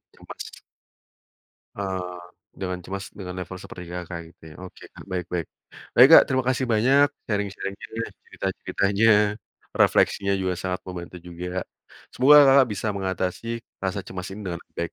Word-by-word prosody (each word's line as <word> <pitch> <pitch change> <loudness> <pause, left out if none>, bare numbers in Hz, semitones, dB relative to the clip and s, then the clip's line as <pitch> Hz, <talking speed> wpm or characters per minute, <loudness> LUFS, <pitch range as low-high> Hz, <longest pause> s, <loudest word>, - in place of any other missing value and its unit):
ya, - - -23
Mas - - -6 1.4
Eee, 90 -2 -4 0.4
dengan 90 -1 -3
cemas 100 +3 -5
dengan 90 -3 -7
level 90 +1 -6
seperti, 90 - -9
Kakak, 90 -1 -5
gitu - - -57
ya? 75 - -12
Oke, 90 - -12
Kak, - - -13
baik 90 -2 -3
baik. 85 -2 -2 0.5
Baik, 125 +3 +9
Kak, - - +7
terima 130 -2 +1
kasih 130 0 +1
banyak 130 +6 +4 0.2
sharing-sharing-nya, 100 +2 -3 0.2
cerita-ceritanya, 100 +3 0 0.7
refleksinya 100 0 +3
juga 95 -1 -1
sangat 90 0 -3
membantu 90 -1 -8
juga, 90 +1 -5 0.5
semoga, 140 +4 +6
Kakak, 135 -1 +6
bisa 110 - -3
mengatasi 95 +1 -3 0.3
rasa 95 0 -3
cemas 90 0 -7
ini 105 - -8
dengan 85 - -4 0.2
baik. 85 - -3
95 Hz, 145 wpm, -24 LUFS, 90-105 Hz, 1.4 s, Baik